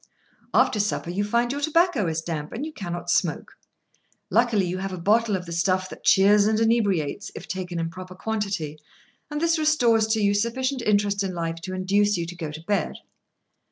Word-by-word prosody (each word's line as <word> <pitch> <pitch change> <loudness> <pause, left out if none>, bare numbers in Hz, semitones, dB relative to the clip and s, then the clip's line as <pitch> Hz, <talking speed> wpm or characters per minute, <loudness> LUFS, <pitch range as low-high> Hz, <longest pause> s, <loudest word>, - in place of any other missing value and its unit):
After 210 - +3
supper, 200 -4 -1
you 200 +3 -1
find 235 +3 +1
your 285 +1 -3
tobacco 315 - +2
is 160 0 -2
damp, 155 -3 -4
and 255 +6 -4
you 315 - -7
cannot 175 -6 -4
smoke. - - 0 0.8
Luckily 230 -5 +3
you 180 +1 -3
have 195 0 -4
a 185 - -5
bottle 210 +4 +2
of 180 -1 -4
the 170 - -8
stuff 185 +2 0
that - - -11
cheers 205 +2 +5
and 220 0 +2
inebriates, 205 -10 +1
if - - -8
taken 180 -1 -4
in 165 0 -2
proper 185 0 -9
quantity, 195 -7 -3 0.5
and 295 0 -3
this 330 0 +2
restores 240 -8 +3
to 220 0 +1
you 200 -1 +3
sufficient 255 +5 -1
interest 205 -2 +1
in 190 -2 -2
life 165 -1 -3
to 185 +3 -6
induce 200 +2 +2
you 170 - -2
to 175 +1 -8
go 165 -3 -5
to 155 +1 -8
bed. 205 +3 -1
200 Hz, 195 wpm, -24 LUFS, 180-225 Hz, 0.8 s, cheers